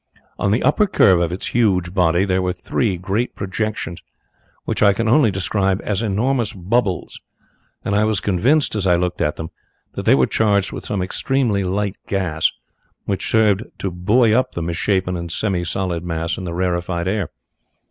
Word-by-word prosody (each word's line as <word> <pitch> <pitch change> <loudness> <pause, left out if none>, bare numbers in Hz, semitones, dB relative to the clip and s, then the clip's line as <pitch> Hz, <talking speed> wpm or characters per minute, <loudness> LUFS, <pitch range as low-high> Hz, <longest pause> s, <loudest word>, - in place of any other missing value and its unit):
On 100 - +1
the 110 +4 +1
upper 205 +8 +3
curve 95 - +4
of 85 -1 0
its 90 - -4
huge 95 -7 +2
body 90 0 +2
there 95 -1 +1
were 90 0 -1
three 95 +1 -1
great 95 +7 -2
projections 95 -3 -3 0.6
which - - -2
I 100 -2 +6
can 115 +3 -1
only 120 +1 +5
describe 95 0 0
as 105 -1 -1
enormous 115 +2 0
bubbles, 100 +1 -1 0.6
and 100 - -1
I 105 +1 +3
was 110 -2 +1
convinced 115 - +2
as 100 -3 0
I 90 - +5
looked 90 +1 -1
at 75 - 0
them 80 - -7 0.4
that - - -5
they - - +6
were 65 -2 +4
charged 100 -3 +1
with - - -7
some 100 -3 -1
extremely 115 0 0
light 100 +2 -2
gas 90 -5 0 0.5
which 95 -2 -2
served 105 -3 +3 0.2
to 95 - -3
buoy 105 +6 +3
up 130 +2 +1
the 85 - -3
misshapen 90 +2 0
and 85 -1 -5
semi 95 -1 -1
solid 90 -1 -2
mass 85 -1 -2
in 95 - -6
the 85 - -4
rarefied 85 -1 -1
air. 100 -3 -1
95 Hz, 180 wpm, -20 LUFS, 90-110 Hz, 0.6 s, I